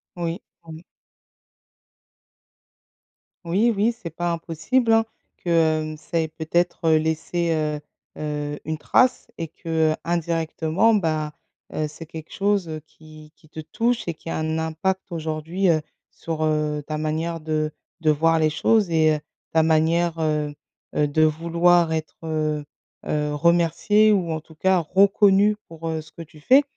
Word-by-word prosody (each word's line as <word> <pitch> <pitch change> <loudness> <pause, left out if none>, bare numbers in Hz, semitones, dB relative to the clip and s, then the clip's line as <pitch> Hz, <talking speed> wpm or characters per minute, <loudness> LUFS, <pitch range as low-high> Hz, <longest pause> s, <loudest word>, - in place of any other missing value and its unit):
Oui, 170 +1 -3 0.3
mmh. 160 0 -9 2.6
Oui, 200 +8 +2
oui, 215 +3 +2
c'est 225 -7 -8
pas 170 +1 -2
impossible, 170 +9 0
hein, 225 0 +4 0.3
que, 175 - -6
hem, 155 -2 +2
ça 155 +2 -3
ait 160 - 0
peut-être, 160 +2 -1
heu, 160 - +5
laissé, 160 +2 -1
heu 150 -1 -1 0.4
heu, 150 -1 -3
une 155 +1 -2
trace 255 +10 +2
et 165 - -3
que 160 -1 0
indirectement, 165 +4 +1
ben, 155 -6 0 0.4
heu, 155 - -1
c'est 150 +2 -10
quelque 160 -1 -10
chose, 200 -2 +1
heu, 155 -1 -5
qui 155 -1 -15
qui 155 - -22
te 155 +1 -8
touche 230 +6 -1
et - - -1
qui 165 - -10
a - - -2
un 160 0 -1
impact 165 +4 -2
aujourd'hui, 160 +3 -1
heu, 160 -2 +3 0.3
sur, 160 -1 -4
heu, 150 -1 0
ta 155 0 -3
manière 160 +2 -2
de 155 -1 -1 0.3
de 155 -2 +4
voir 165 +2 +3
les 155 -1 +3
choses 205 +6 +2
et 160 -1 +4
heu, - - -4 0.3
ta 160 0 +4
manière, 165 +1 +2
heu 150 -2 0 0.4
heu, 150 - +3
de 155 +2 +2
vouloir 170 +2 +3
être, 160 -1 -4
heu, 155 -2 -1 0.4
remercié 170 +7 +3
ou 185 -5 +1
en 160 - -4
tout 160 +1 -18
cas, 190 +3 +3
reconnu 195 +4 +4
pour, 165 0 -7
heu, 160 -1 -2
ce 155 0 -17
que 165 - -9
tu 155 -1 -17
fais. 265 - +6
160 Hz, 155 wpm, -23 LUFS, 155-175 Hz, 2.6 s, fais